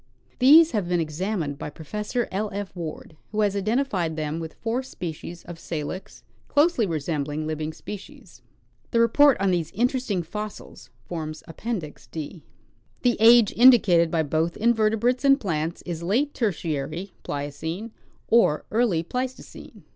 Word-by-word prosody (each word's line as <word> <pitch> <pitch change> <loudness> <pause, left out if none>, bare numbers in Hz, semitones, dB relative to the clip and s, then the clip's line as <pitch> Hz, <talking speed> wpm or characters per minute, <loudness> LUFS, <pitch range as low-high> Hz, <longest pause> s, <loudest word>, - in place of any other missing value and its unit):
These 310 +6 +7
have 205 -6 -1
been 175 -1 +2
examined 160 -2 -2
by - - -5
Pro 155 +2 -12
fessor 210 - -2
L. 205 +2 -2
F. 200 -1 -5
Ward, 165 -2 -7 0.2
who 215 0 0
has 205 -1 +1
identified 200 - 0
them 155 +1 -3
with 160 -1 -7
four 230 +3 -2
species 175 - -7
of 175 -1 -9
Salix, 175 +6 -6 0.2
closely 290 - +3
resembling 155 -2 -2
living 155 0 -3
species. 205 +5 -10 0.5
The 235 - +1
report 265 +4 +5
on 195 -1 +2
these 170 -3 0
in 235 +5 +2
teresting 250 -9 -2
fossils 210 +2 -8 0.2
forms 155 -2 -6
Appendix 170 -3 -5
D. 160 +1 -7 0.6
The 245 -1 +3
age 230 -1 +7
indicated 215 -9 +6
by 160 -1 +1
both 160 +3 -1
invertebrates 230 +2 +2
and 275 0 +5
plants 165 - -3
is 170 -2 -5
late 240 +12 0
Ter 225 -4 +1
tiary 160 +3 -4
(Pliocene) 160 +9 -5 0.4
or 220 -10 +3
early 215 -8 +2
Pleistocene. 255 +8 -6
190 Hz, 145 wpm, -25 LUFS, 160-230 Hz, 0.6 s, These